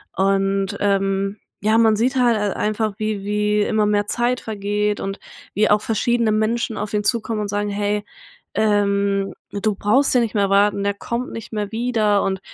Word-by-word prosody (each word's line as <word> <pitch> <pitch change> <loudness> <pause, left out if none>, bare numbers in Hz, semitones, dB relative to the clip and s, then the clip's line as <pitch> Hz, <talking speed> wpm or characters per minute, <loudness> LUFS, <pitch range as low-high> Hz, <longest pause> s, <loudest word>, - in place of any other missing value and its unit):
und, 195 0 +1
ähm, 195 0 0 0.2
ja, 215 +2 +3
man 220 -1 +4
sieht 245 +5 0
hal 240 -3 +3
halt 205 -1 -1
einfach 215 0 -1
wie 215 -2 -2
wie 210 +1 +1
immer 215 0 +1
mehr 205 0 +1
Zeit 245 +3 0
vergeht 210 -1 -2
und 195 +1 -4 0.4
wie 215 +1 +3
auch 210 0 +4
verschiedene 230 +1 +1
Menschen 220 +1 0
auf 210 0 -4
ihn 210 0 0
zukommen 225 -1 0
und 210 - -2
sagen: 205 +1 -1
„Hey, 205 +1 -1 0.5
ähm, 200 -2 +1 0.2
du 205 +1 -1
brauchst 255 +8 +2
hier 250 - +4
nicht 230 -2 -2
mehr 200 -3 +1
warten, 200 0 +3
er 200 - +1
kommt 235 +4 -4
nicht 225 - -8
mehr 210 -2 -3
wieder.“ 220 -3 +1
Und 190 -1 -1
210 Hz, 180 wpm, -21 LUFS, 200-220 Hz, 0.5 s, man